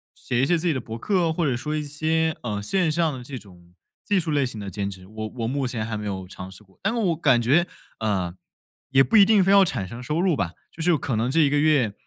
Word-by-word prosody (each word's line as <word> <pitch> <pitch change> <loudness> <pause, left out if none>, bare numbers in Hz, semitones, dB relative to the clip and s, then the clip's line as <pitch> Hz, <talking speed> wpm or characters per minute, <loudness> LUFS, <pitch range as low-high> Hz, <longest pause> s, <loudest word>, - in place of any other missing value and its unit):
写 120 +1 -1
一 135 - +2
些 175 - +3
自 165 - -4
己 165 - +3
的 130 - -3
博 115 0 -7
客 175 - +1
或 165 +1 -1
者 130 -4 +1
说 150 +5 -3
一 150 - -2
些， 160 +2 0
呃， 105 -4 -3
线 165 - 0
上 160 -3 0
的 125 - -8
这 130 +1 -7
种 90 -5 -16 0.3
技 205 -2 +1
术 165 -3 -3
类 140 -3 +2
型 115 -3 -7
的 100 -1 -6
兼 100 +1 -3
职， 95 -1 -10
我 110 +2 -6
我 115 -1 -2
目 135 +1 -1
前 115 -3 -3
还 110 -1 -4
没 105 0 -4
有 95 -2 -4
尝 90 0 -9
试 100 +3 -13
过， 95 -1 -27
但 195 - 0
是 240 - -2
我 180 -7 +1
感 135 -6 +3
觉， 150 +10 +3 0.3
呃， 95 -6 -1 0.6
也 135 0 +5
不 225 - -1
一 205 - +9
定 205 -1 +5
非 195 - +3
要 200 -1 +7
产 120 - -2
生 115 +6 -8
收 150 +6 -2
入 180 -2 +2
吧， 90 -8 -2 0.2
就 165 - -9
是 170 -1 +3
可 130 -5 -2
能 115 +3 0
这 165 +4 +3
一 145 -2 +3
个 145 - +2
月， 145 -9 +3
135 Hz, 305 characters per minute, -24 LUFS, 110-160 Hz, 0.6 s, 一